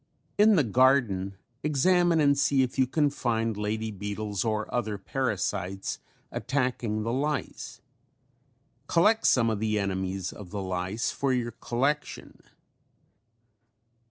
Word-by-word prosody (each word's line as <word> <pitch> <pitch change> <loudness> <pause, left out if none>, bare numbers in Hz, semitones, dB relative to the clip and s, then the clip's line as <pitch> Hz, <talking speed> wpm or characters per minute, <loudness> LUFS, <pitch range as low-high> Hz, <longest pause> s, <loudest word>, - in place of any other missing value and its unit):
Dept. - - -42
Agri.)] 205 - -2
In 215 0 +6
the 155 - +4
garden 115 -6 +2 0.3
examine 170 +4 +3
and 140 -2 +4
see 140 -1 +3
if 130 +1 -4
you 130 - +4
can 145 +2 +1
find 115 -4 -1
lady 110 +2 -2
beetles 105 0 -3
or 110 -1 -1
other 110 -4 -1
parasites 95 -4 -2 0.3
attacking 125 -5 -1
the 115 +2 -2
lice. 145 +1 -3 1.1
Collect 210 +6 +3
some 115 -3 +4
of 110 - -2
the 110 0 0
enemies 95 -2 -2
of 100 -4 -10
the 100 0 -4
lice 95 +4 -2
for 135 -1 -1
your 120 -2 -1
collection. 130 +6 -2
115 Hz, 130 wpm, -27 LUFS, 105-140 Hz, 1.1 s, In